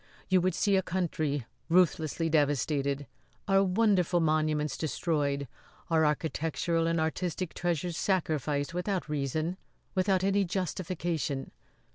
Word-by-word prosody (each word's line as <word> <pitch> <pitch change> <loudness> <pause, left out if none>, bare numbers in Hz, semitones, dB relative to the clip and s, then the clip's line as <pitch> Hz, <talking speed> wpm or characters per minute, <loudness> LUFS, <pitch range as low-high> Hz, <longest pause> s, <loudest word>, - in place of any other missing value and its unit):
You 185 -1 +4
would 185 +1 +1
see 200 -2 +2
a - - +3
country 155 -7 -1 0.2
ruthlessly 165 -2 +2
devastated; 145 -2 +1 0.4
our 195 -1 +4
wonderful 185 -3 +3
monuments 155 -2 +1
destroyed; 145 -3 -1 0.4
our 160 -1 +4
architectural 165 +2 0
and 165 0 +1
artistic 170 +2 -2
treasures 175 -1 -1
sacrificed 155 -5 0
without 180 0 -2
reason 155 +4 -1 0.4
without 190 -1 +2
any 195 +1 +3
justification." 170 -5 -2
165 Hz, 110 wpm, -30 LUFS, 150-185 Hz, 0.4 s, You